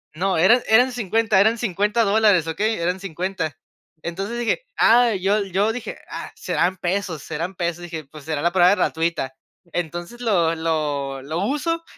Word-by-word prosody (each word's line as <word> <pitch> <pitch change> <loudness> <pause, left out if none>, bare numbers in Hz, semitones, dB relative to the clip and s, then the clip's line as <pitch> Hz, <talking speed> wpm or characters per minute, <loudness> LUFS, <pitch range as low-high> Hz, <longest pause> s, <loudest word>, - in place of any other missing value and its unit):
no, 185 +2 0
eran 230 +9 +5
eran 245 +4 +5
50, 220 -3 +1
eran 220 +3 +3
$50 210 +1 +1
dólares, 205 -5 +4
¿okey?, 210 +8 0
eran 180 +2 -1
50. 180 -5 -3 0.5
Entonces, 195 +7 -4
dije: 240 - 0
"Ah, 235 -1 +5
yo 200 +3 +2
yo", 195 +3 +1
dije: 245 - -6
"Ah, - - -6
serán 185 +1 0
pesos 180 -4 -2
serán 170 +4 -4
pesos", 170 0 -2
dije: 160 -4 -6
"Pues, 145 0 -13
será 155 -2 -2
la 175 - +3
prueba 180 +1 +5
gratuita". 160 -8 -1 0.4
Entonces, 175 +7 -4
lo 180 -8 +2
lo 145 -4 -2
lo 155 +4 -3
uso 330 +6 -1
185 Hz, 160 wpm, -22 LUFS, 165-220 Hz, 0.5 s, eran